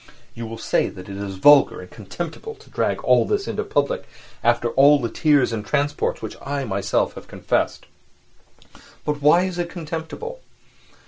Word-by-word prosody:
You 115 -1 -6
will 115 0 -7
say - - 0
that 95 0 -11
it 100 - -6
is 100 -1 -5
vulgar 145 +9 +6
and 90 - -9
contemptible 170 - -7
to - - -20
drag - - -1
all - - +5
this 410 -1 -1
into - - -2
public - - -1 0.4
after 120 0 +2
all 140 +4 +6
the 115 -5 -3
tears 145 -5 +3
and 105 -2 -3
transports 145 +2 -1
which 110 - -5
I 140 0 -3
have 130 - -5
myself 100 0 0
confessed. - - -1 1.2
But 150 -1 -2
why 160 +5 +5
is 185 -2 -3
it 175 -1 -2
contemptible? 170 - -6
145 Hz, 170 wpm, -22 LUFS, 115-170 Hz, 1.2 s, vulgar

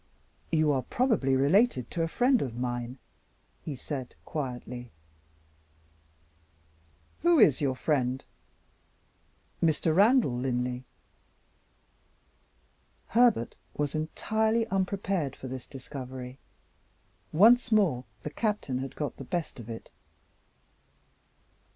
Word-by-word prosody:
"You 155 -2 +3
are 135 -2 +1
probably 215 - +1
related 145 - +3
to 170 - -2
a 165 - +1
friend 245 +7 +3
of 120 -4 -3
mine?" 120 0 -3 0.7
he 150 - -4
said, 130 -1 -6
quietly. 125 -4 -5 2.3
"Who 345 0 +5
is 150 - +5
your 135 -3 +1
friend?" 130 -2 0 1.4
"Mr. 160 0 +2
Randal 210 - +5
Linley." 125 0 -2 2.2
Herbert 230 - +3 0.2
was 145 -1 -1
entirely 220 +8 0
unprepared 190 - -1
for 130 - -8
this 130 -1 -7
discovery. 130 -1 -8 0.9
Once 230 +8 +6
more, 175 - +3 0.2
the 150 - -4
Captain 210 - -1
had 135 0 -5
got 150 -2 -4
the - - -7
best 165 0 -3
of 115 -1 -9
it. 115 0 -8
145 Hz, 100 wpm, -29 LUFS, 125-195 Hz, 2.3 s, Once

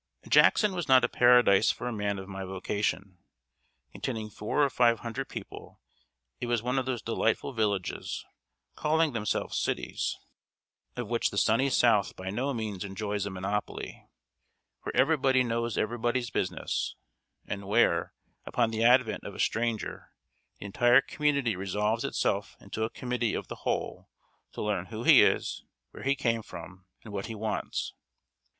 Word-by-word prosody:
] - - -20
Jackson 210 -3 +5
was 175 -4 -3
not 130 -1 +6
a - - +4
paradise 120 -5 +5
for - - -2
a 120 - -2
man 105 -2 -1
of 95 0 -7
my 95 -1 -6
vocation. 95 -1 -3 0.7
Containing 110 -4 -4
four 110 +9 0
or 140 - +3
five 120 -2 +3
thousand 120 +3 -4
people, - - -9 0.6
it 120 - -3
was 120 -2 0
one 125 +2 +1
of 130 - -4
those 125 -4 -2
delightful 115 +3 0
villages, 105 -5 -2 0.5
calling 155 -1 +1
themselves 105 -3 -1
cities, - - -2 0.8
of 120 -3 -4
which 120 +1 +1
the 100 - -7
sunny 115 +7 +3
South 115 -5 +3
by 95 +1 -5
no 130 +7 -1
means 110 -6 -4
enjoys 100 0 -3
a - - -3
monopoly 95 +2 -4 0.7
where - - -5
everybody 135 -2 +4
knows 115 -1 -2
everybody's 120 +2 -1
business, 90 - -2 0.5
and 100 -1 -5
where, 100 -5 +2 0.3
upon 115 -2 0
the 110 0 -1
advent 120 -1 +4
of - - -8
a - - -10
stranger, 115 -1 -1 0.5
the - - -8
entire 120 +5 +5
community 140 -7 0
resolves 105 +4 -1
itself - - -1
into 110 - -5
a 110 - 0
Committee 125 -3 -2
of - - -5
the - - -8
Whole - - -2 0.4
to - - -4
learn 100 -4 -1
who 115 0 -6
he - - +8
is, - - +1 0.3
where - - -11
he 135 +1 +1
came 115 -4 0
from, 90 -2 -11 0.2
and 110 - -10
what 100 +1 -3
he 115 - -6
wants. 110 0 -3
115 Hz, 160 wpm, -29 LUFS, 100-125 Hz, 0.8 s, he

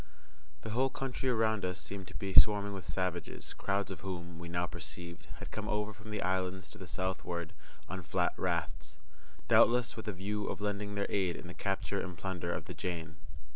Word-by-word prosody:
The 110 - -3
whole 130 +4 +3
country 130 -1 -1
around 110 -3 +3
us 90 -2 -1
seemed 95 +5 -5
to - - -10
be 95 -1 -3
swarming 100 0 +7
with 95 -2 -6
savages, 90 -3 -2
crowds 100 0 0
of 95 - -5
whom, 85 -3 -5
we 85 0 -6
now 85 +1 +1
perceived, 85 0 -6
had - - -8
come - - -3
over 105 0 0
from 105 +2 -11
the 105 - -1
islands 95 -2 0
to 105 - -11
the 95 - -7
southward 90 -1 -2 0.3
on 95 0 -4
flat 75 -3 +1
rafts, 75 0 -1 0.5
doubtless 120 0 +6
with 110 - -6
a 105 - 0
view 100 +3 -2
of - - -2
lending 105 0 -1
their 100 0 +1
aid 95 -4 +1
in - - -7
the 85 - -6
capture 95 +3 0
and 90 -2 -5
plunder 90 -2 -2
of - - -2
the - - -5
Jane. 80 -3 -3
95 Hz, 200 wpm, -34 LUFS, 85-105 Hz, 0.5 s, swarming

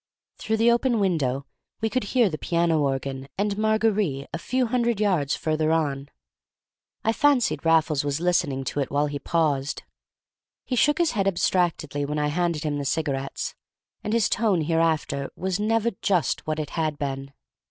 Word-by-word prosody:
Through 220 0 -1
the 230 +2 +4
open 240 -1 +2
window 140 -9 0 0.3
we 225 - 0
could 245 0 -1
hear 240 +2 +3
the 155 -5 -4
piano 170 -2 +1
organ 135 -1 -2
and 200 +1 0
"Mar—gar—rì" 215 -9 +1
a 165 - -3
few 255 +7 0
hundred 235 -2 0
yards 180 -10 +1
further 155 0 0
on. 145 -4 -1 0.9
I 225 - +2
fancied 280 -2 +2
Raffles 160 -3 +3
was 145 0 -1
listening 165 -6 +1
to 135 - -3
it 135 - -1
while 145 +1 +1
he 145 -1 -4
paused. 145 -5 0 0.8
He 255 - -2
shook 295 +5 +3
his 340 -2 +2
head 195 -3 0
abstractedly 170 -6 0
when 150 +1 -2
I 150 0 +1
handed 170 -1 -1
him 145 -2 -1
the - - -2
cigarettes; 140 -2 -2 0.5
and 210 - -3
his 230 -1 +3
tone 205 -7 +1
hereafter 160 -3 0
was 190 +1 -2
never 225 +2 +1
just 180 -7 0
what 155 0 -1
it 155 -2 -4
had 155 -3 -1
been. 135 -1 -4
165 Hz, 170 wpm, -25 LUFS, 145-210 Hz, 0.9 s, the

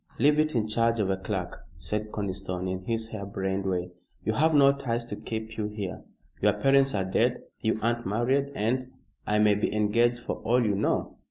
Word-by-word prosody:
"Leave 145 +4 +4
it 155 -2 +1
in 110 -2 +1
charge 115 +1 +1
of 100 -2 +1
a - - +2
clerk," 95 -2 -4
said 105 0 -3
Conniston, 95 -2 -3
in 95 0 -4
his 115 -1 -2
hair 110 -3 -6
brained 95 -1 -2
way. 90 -1 -1 0.3
"You 110 - +1
have 155 +6 +3
no 140 -1 +7
ties 120 -4 -2
to - - -5
keep 110 0 -6
you 105 -1 -1
here. 105 -3 -5 0.4
Your - - +4
parents 135 -2 +3
are 95 -2 0
dead 95 - +1 0.2
you 110 0 0
aren't 120 +1 0
married, 130 +7 +1
and 125 +4 0 0.2
" - - -40
"I 105 - +2
may 105 -1 +5
be 105 - 0
engaged 115 +3 +2
for 120 - -4
all 120 +1 +2
you 105 - +2
know." - - -1
110 Hz, 205 wpm, -27 LUFS, 100-120 Hz, 0.4 s, no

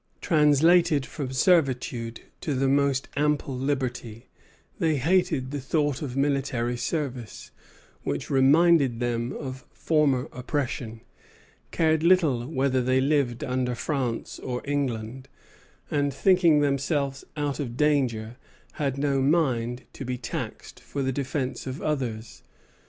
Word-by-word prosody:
Translated 150 -1 +4
from 135 -3 -5
servitude 130 -6 +1 0.2
to 145 - -2
the 135 +1 +1
most 140 -1 +2
ample 145 -2 0
liberty, 125 -4 -3 0.5
they 160 -2 +2
hated 145 -3 +1
the 145 -1 -3
thought 145 +1 0
of 135 -3 -5
military 135 -4 0
service, 125 -4 -4 0.5
which 70 - -3
reminded 140 -1 +4
them 120 0 -1
of 130 -2 -6
former 150 -4 +1
oppression, 125 -3 -3 0.7
cared 160 -1 +2
little 160 -9 +3
whether 130 -3 +1
they 130 +1 +2
lived 135 -3 +1
under 125 -1 -1
France 125 -2 -3
or 125 -1 -4
England, 130 -3 -3 0.6
and, 145 -1 +1
thinking 170 +1 +4
themselves 140 -1 0
out 145 -1 -2
of 125 -4 -4
danger, 125 -6 +1 0.4
had 135 -2 0
no 140 -1 +1
mind 130 -5 +1
to - - -7
be 125 -1 -3
taxed 125 - -6
for 140 - -4
the 130 - 0
defence 135 0 -3
of 130 +3 -5
others. 120 -7 -3
135 Hz, 125 wpm, -26 LUFS, 125-145 Hz, 0.7 s, Translated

